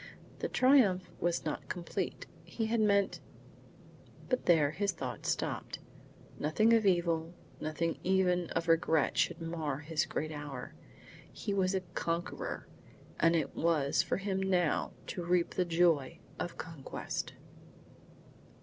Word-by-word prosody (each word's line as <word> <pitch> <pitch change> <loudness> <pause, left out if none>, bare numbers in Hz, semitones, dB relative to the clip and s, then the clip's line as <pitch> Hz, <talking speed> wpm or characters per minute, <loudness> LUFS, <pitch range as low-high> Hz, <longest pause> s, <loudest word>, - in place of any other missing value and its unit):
The - - -1
triumph 215 -10 +4
was 170 -1 0
not 155 - -4
complete. 175 -2 -3 0.2
He 225 - -3
had 225 +1 +1
meant 200 -2 +3 1.1
But 255 - 0
there 155 -4 +5
his 200 +5 0
thought 125 -4 -5
stopped. - - -2 0.6
Nothing 215 +10 +3
of 220 -3 +4
evil, 170 -2 +1 0.2
nothing 155 +2 -2
even 180 -2 +2
of 170 - 0
regret 160 -2 +3
should 175 -1 +1
mar 165 -4 -3
his 160 +1 -1
great 155 +1 -3
hour. 145 -4 -6 0.6
He 200 - -3
was 190 -1 +2
a 190 - +1
conqueror, 170 +1 -3 0.5
and 165 +1 +4
it 160 -4 -1
was 155 -4 +2
for - - -1
him 195 -1 -1
now 180 -4 +1
to 180 - -4
reap 175 0 +2
the 180 - 0
joy 165 -5 +2 0.2
of 175 - -4
conquest. 160 -5 -5
170 Hz, 130 wpm, -32 LUFS, 160-190 Hz, 1.1 s, there